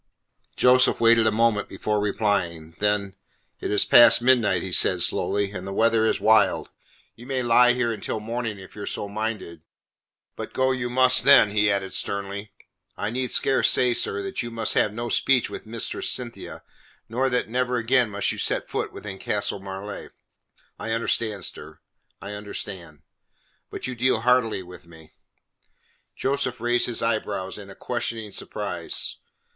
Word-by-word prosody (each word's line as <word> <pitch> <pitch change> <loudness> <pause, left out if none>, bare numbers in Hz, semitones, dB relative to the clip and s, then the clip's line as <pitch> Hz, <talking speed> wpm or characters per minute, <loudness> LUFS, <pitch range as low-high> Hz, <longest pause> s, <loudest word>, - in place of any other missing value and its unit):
Joseph 125 0 +4
waited 115 -1 +5
a - - +3
moment 110 -1 +1
before 105 +2 -2
replying. 95 -6 -1
Then: 105 -1 0 0.5
"It - - -4
is 105 - +3
past 120 -1 +7
midnight," 120 -3 +2
he - - -5
said - - +3
slowly, 100 -1 0
"and 95 -1 -7
the - - -5
weather 110 +2 +2
is - - 0
wild. 110 +1 +3 0.4
You 120 +2 -13
may 130 -2 -1
lie 125 +1 +5
here 120 -2 0
until 110 - -4
morning, 115 0 -4
if 95 0 -13
you 105 - -8
are - - -6
so 105 - -3
minded. 105 -6 -5 0.7
But - - -7
go 130 0 +1
you 125 -2 -2
must 130 -1 +4
then," 135 -6 +6
he 105 0 +2
added 100 -1 -2
sternly. 100 +1 -3 0.5
"I 105 - -3
need 125 +1 -2
scarce 135 - +2
say, 125 -1 +3
sir, 395 - 0
that 390 -1 -3
you 120 - -5
must 115 -1 -2
have 105 - +2
no 120 +3 -5
speech 125 +2 +1
with - - -8
Mistress 115 0 -2
Cynthia, 120 -2 -5 0.4
nor 130 +4 0
that 125 -1 0
never 125 +2 -1
again 120 0 +2
must 100 0 -1
you - - -6
set - - -1
foot - - -2
within 100 -2 -8
Castle 100 -1 -2
Marleigh." 95 +1 -7 0.7
"I 115 - -3
understand, 110 -4 -1
sir; - - -7 0.4
I 100 - -8
understand. 95 -6 -7 0.7
But - - -7
you 125 - -4
deal 125 -1 +1
hardly 120 -5 +2
with 90 -1 -14
me." 80 -2 -16 1.0
Joseph 135 -2 -2
raised 120 +1 +1
his 120 -2 -3
eyebrows 105 -4 -2
in 100 -1 -11
questioning 115 -3 -4
surprise. - - -3
110 Hz, 165 wpm, -24 LUFS, 100-120 Hz, 1.0 s, past